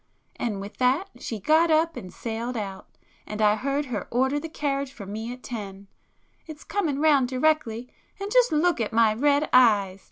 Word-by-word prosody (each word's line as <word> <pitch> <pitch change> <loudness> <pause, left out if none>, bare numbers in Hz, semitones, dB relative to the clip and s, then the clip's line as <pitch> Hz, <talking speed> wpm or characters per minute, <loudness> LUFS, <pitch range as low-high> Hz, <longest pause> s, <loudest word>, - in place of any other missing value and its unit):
And 215 -5 -2
with 200 +1 -9
that 270 +10 +1
she 225 - -5
got 315 - +3
up 320 +1 +2
and 185 - -8
sailed 235 +2 -4
out,—and 205 +1 -9
I 210 -1 +4
heard 275 +5 -1
her 230 -8 -4
order 265 +4 +1
the 325 - -7
carriage 280 -3 -2
for 210 -6 -10
me 220 +4 -5
at 250 0 -10
ten. 200 -4 -7 0.6
It's 310 -1 -10
coming 335 -9 -1
round 290 -4 +4
directly, 255 -3 0 0.3
and 400 +1 -5
just - - +4
look 315 -2 +2
at 220 - -2
my 225 -1 +4
red 285 +5 +2
eyes! 205 -6 +4
255 Hz, 180 wpm, -25 LUFS, 215-300 Hz, 0.6 s, I